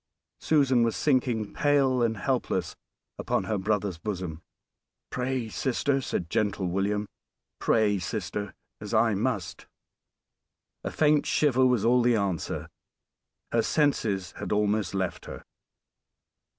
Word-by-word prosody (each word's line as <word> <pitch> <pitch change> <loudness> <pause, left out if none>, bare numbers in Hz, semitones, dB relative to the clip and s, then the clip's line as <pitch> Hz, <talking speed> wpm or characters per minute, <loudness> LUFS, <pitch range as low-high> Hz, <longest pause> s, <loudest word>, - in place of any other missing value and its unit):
Susan 135 -5 +3
was 115 -1 +1
sinking 125 -7 +1
pale 140 -3 +2
and 115 -2 +1
helpless 95 - -1 0.4
upon - - 0
her 100 +2 -1
brother's 100 -3 -1
bosom. 90 -5 -4 0.7
"Pray, 125 -1 -2
sister," 135 +4 0
said 90 -8 -3
gentle 100 +1 0
William; 100 +3 -1 0.5
"pray, 105 -3 +2
sister, 100 +1 -4 0.2
as - - -4
I 115 -2 +4
must." 100 -4 -2 1.2
A - - -2
faint 150 -1 +2
shiver 130 -3 +3
was 125 -5 +2
all 125 +1 +4
the 120 0 +3
answer; 100 -6 -2 0.8
her 115 - +3
senses 110 - 0
had - - -5
almost 105 -2 +1
left 95 -2 -2
her. - - -8
110 Hz, 120 wpm, -27 LUFS, 100-130 Hz, 1.2 s, I